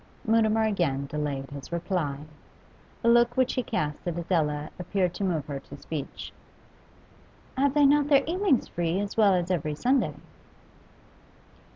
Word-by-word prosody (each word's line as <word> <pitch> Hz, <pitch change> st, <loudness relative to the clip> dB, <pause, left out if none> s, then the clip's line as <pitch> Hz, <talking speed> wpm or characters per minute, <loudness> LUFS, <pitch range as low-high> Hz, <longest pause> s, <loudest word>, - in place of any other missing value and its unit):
Mutimer 220 Hz, 0 st, +3 dB
again 170 Hz, -11 st, 0 dB
delayed 140 Hz, -2 st, -4 dB
his 140 Hz, +2 st, -9 dB
reply. 170 Hz, -5 st, -2 dB, 0.8 s
A -, -, +1 dB
look 240 Hz, +1 st, +4 dB
which 260 Hz, -1 st, +2 dB
he 255 Hz, -, 0 dB
cast 150 Hz, -8 st, -3 dB
at 170 Hz, -1 st, -2 dB
Adela 155 Hz, -4 st, -1 dB
appeared 180 Hz, 0 st, 0 dB
to 200 Hz, -, -4 dB
move 165 Hz, -7 st, -1 dB
her 140 Hz, -2 st, -5 dB
to -, -, -12 dB
speech. 150 Hz, -4 st, -6 dB, 1.2 s
'Have 280 Hz, +1 st, +1 dB
they 295 Hz, -1 st, +5 dB
not 290 Hz, +1 st, +4 dB
their 280 Hz, -2 st, +5 dB
evenings 350 Hz, -, +1 dB
free, 175 Hz, +1 st, -1 dB
as 205 Hz, 0 st, -3 dB
well 205 Hz, -4 st, +5 dB
as 180 Hz, 0 st, -1 dB
every 155 Hz, -4 st, -1 dB
Sunday? 255 Hz, -, +1 dB
180 Hz, 150 wpm, -27 LUFS, 150-235 Hz, 1.2 s, they